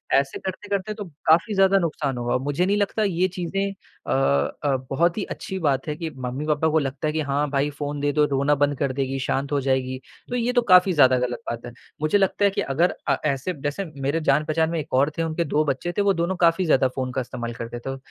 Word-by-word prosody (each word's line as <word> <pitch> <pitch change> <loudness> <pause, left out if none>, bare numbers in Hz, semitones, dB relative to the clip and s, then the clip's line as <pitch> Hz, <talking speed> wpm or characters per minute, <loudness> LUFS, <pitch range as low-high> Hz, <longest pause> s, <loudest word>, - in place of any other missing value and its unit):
ऐसे 135 0 +1
करते-करते 200 +2 -3
तो 210 -1 -6 0.2
काफ़ी 165 +6 +4
ज़्यादा 195 0 +5
नुकसान 150 -6 -2
होगा, 120 +1 0
मुझे 145 +7 0
नहीं 200 +2 +2
लगता 210 +1 0
ये 185 -2 +1
चीज़ें 190 +2 -2
अ 195 - -11 0.5
अ, 140 -2 +2
बहुत 170 +7 +1
ही 205 - -1
अच्छी 190 - -6
बात 140 -3 0
है 150 - -2
कि 165 -1 -4 0.2
मम्मी-पापा 150 +5 0
को 160 +1 +3
लगता 140 +1 -3
है 150 - -1
कि 160 - 0
हाँ 145 +1 +1
भाई 140 +1 +1
फ़ोन 145 0 -5
दे 145 0 +1
दो, 150 -1 +4
रोना 140 +1 +2
बंद 145 -1 +1
कर 140 -2 0
देगी, 135 0 -2
शाँत 135 +2 -2
हो 145 - +2
जाएगी, 130 -1 0 0.3
तो 245 - -2
ये 245 +1 0
तो 245 - +4
काफ़ी 185 -4 +5
ज़्यादा 130 -4 +5
गलत 125 -1 -2
बात 120 +1 -5
है। 120 - -7 0.3
मुझे 155 +6 +3
लगता 200 +1 +2
है 200 - +4
कि 200 - -1
अगर 165 +3 +1
अ, - - +3
ऐसे 140 +5 -1
जैसे 145 +7 -2 0.2
मेरे 140 +5 0
जान-पहचान 155 +2 +2
में 165 -1 -1
एक 150 -1 -7
और 140 +3 +4
थे, 165 - +1
उनके 165 +1 -1
2 150 +2 +1
बच्चे 140 +5 -1
थे - - +3
वो 200 -1 +3
दोनों 170 +2 -1
काफ़ी 170 +2 +3
ज़्यादा 135 -4 +4
फ़ोन 130 -1 -2
का 130 - -1
इस्तेमाल 120 -1 -5
करते 115 +1 -6
थे, 135 +2 -5
150 Hz, 240 wpm, -24 LUFS, 135-180 Hz, 0.5 s, ज़्यादा